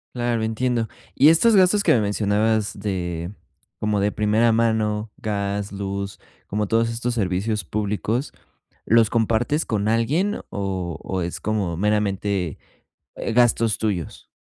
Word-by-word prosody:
Claro, 120 Hz, -2 st, 0 dB
entiendo. 115 Hz, +1 st, 0 dB, 0.3 s
Y 145 Hz, +4 st, +6 dB
estos 210 Hz, +8 st, +5 dB
gastos 195 Hz, +2 st, +4 dB
que -, -, +5 dB
me 115 Hz, -, +3 dB
mencionabas 105 Hz, +1 st, 0 dB
de, 90 Hz, -4 st, -3 dB, 0.5 s
como 105 Hz, -1 st, 0 dB
de 100 Hz, +1 st, +1 dB
primera 110 Hz, +3 st, +2 dB
mano, 110 Hz, -2 st, +1 dB
gas, 100 Hz, -1 st, -2 dB
luz, 100 Hz, 0 st, -4 dB, 0.3 s
como 105 Hz, 0 st, -1 dB
todos 115 Hz, +1 st, +2 dB
estos 120 Hz, +1 st, -2 dB
servicios 105 Hz, 0 st, -1 dB
públicos, 105 Hz, +5 st, -2 dB, 0.5 s
¿los 115 Hz, -1 st, +4 dB
compartes 115 Hz, +7 st, +1 dB
con 105 Hz, -1 st, -1 dB
alguien 150 Hz, -, +1 dB
o 95 Hz, -4 st, -3 dB
o 95 Hz, -1 st, -2 dB
es 85 Hz, 0 st, -4 dB
como 100 Hz, -6 st, -1 dB
meramente, 100 Hz, -4 st, 0 dB, 0.6 s
eh, 115 Hz, -, -3 dB
gastos 115 Hz, -2 st, +3 dB
tuyos? 100 Hz, -7 st, -3 dB
105 Hz, 135 wpm, -23 LUFS, 100-115 Hz, 0.6 s, Y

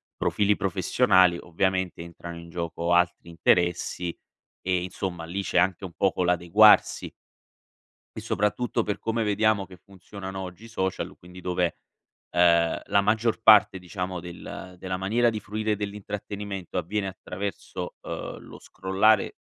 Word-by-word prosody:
profili 105 Hz, 0 st, +1 dB
professionali, 90 Hz, -1 st, +3 dB
ovviamente 95 Hz, +1 st, -1 dB
entrano 85 Hz, 0 st, -9 dB
in 85 Hz, 0 st, -11 dB
gioco 85 Hz, 0 st, -3 dB
altri 85 Hz, 0 st, +1 dB
interessi 85 Hz, +1 st, +1 dB, 0.5 s
e, 90 Hz, -1 st, 0 dB
insomma, 90 Hz, -2 st, -4 dB
lì 95 Hz, +4 st, -3 dB
c'è -, -, -1 dB
anche 90 Hz, +1 st, +2 dB
un 90 Hz, -, -7 dB
poco 95 Hz, -2 st, +1 dB
l'adeguarsi. 90 Hz, +5 st, +5 dB, 1.0 s
E -, -, -5 dB
soprattutto 115 Hz, +4 st, 0 dB
per 105 Hz, -, -2 dB
come 115 Hz, 0 st, -1 dB
vediamo 105 Hz, -1 st, +2 dB
che 90 Hz, -, -13 dB
funzionano 95 Hz, +1 st, -9 dB
oggi 95 Hz, +2 st, -8 dB
i -, -, -10 dB
social, 95 Hz, -5 st, -3 dB
quindi 90 Hz, +1 st, -13 dB
dove, 90 Hz, -1 st, -1 dB, 0.5 s
ehm, 85 Hz, -1 st, +3 dB
la 100 Hz, -, +3 dB
maggior 110 Hz, +3 st, +1 dB
parte, 105 Hz, -2 st, +7 dB
diciamo, 90 Hz, 0 st, -4 dB
del 90 Hz, +2 st, -9 dB
della 95 Hz, 0 st, -3 dB
maniera 115 Hz, +6 st, +2 dB
di 110 Hz, -2 st, -3 dB
fruire 110 Hz, +1 st, -2 dB
dell'intrattenimento 100 Hz, -1 st, -5 dB
avviene 95 Hz, +4 st, -2 dB
attraverso, 95 Hz, -1 st, -6 dB
ehm, -, -, -6 dB
lo -, -, -12 dB
scrollare, 100 Hz, +3 st, +1 dB
95 Hz, 135 wpm, -26 LUFS, 90-105 Hz, 1.0 s, parte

